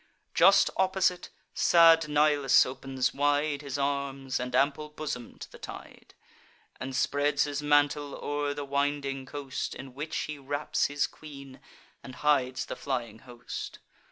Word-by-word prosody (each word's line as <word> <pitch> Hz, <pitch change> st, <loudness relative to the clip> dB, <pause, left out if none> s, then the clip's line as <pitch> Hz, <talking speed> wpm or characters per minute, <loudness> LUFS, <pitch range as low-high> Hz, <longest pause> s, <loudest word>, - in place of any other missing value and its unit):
Just -, -, +5 dB
opposite, 190 Hz, -1 st, +1 dB, 0.2 s
sad 165 Hz, -2 st, +6 dB
Nilus 150 Hz, -3 st, +4 dB
opens 130 Hz, 0 st, -2 dB
wide 145 Hz, +1 st, +1 dB
His 140 Hz, -2 st, -5 dB
arms 140 Hz, -1 st, -2 dB
and 125 Hz, 0 st, -3 dB
ample 140 Hz, +3 st, +1 dB
bosom 150 Hz, -5 st, -6 dB
to -, -, -10 dB
the -, -, -13 dB
tide, -, -, -11 dB, 0.6 s
And 130 Hz, 0 st, -5 dB
spreads 145 Hz, +1 st, +1 dB
his 145 Hz, 0 st, -3 dB
mantle 145 Hz, 0 st, +2 dB
o'er 145 Hz, 0 st, -2 dB
the 145 Hz, -, -5 dB
winding 140 Hz, -1 st, -2 dB
coast, 140 Hz, -1 st, -5 dB
In 135 Hz, -1 st, -9 dB
which 155 Hz, +4 st, -5 dB
he 150 Hz, -1 st, -5 dB
wraps 145 Hz, +2 st, -1 dB
his 145 Hz, 0 st, 0 dB
queen, 140 Hz, -3 st, -11 dB, 0.4 s
and 130 Hz, -, -10 dB
hides 130 Hz, -3 st, +1 dB
the -, -, -6 dB
flying 120 Hz, -5 st, -4 dB
host. 120 Hz, -1 st, -8 dB
145 Hz, 140 wpm, -28 LUFS, 135-150 Hz, 0.6 s, sad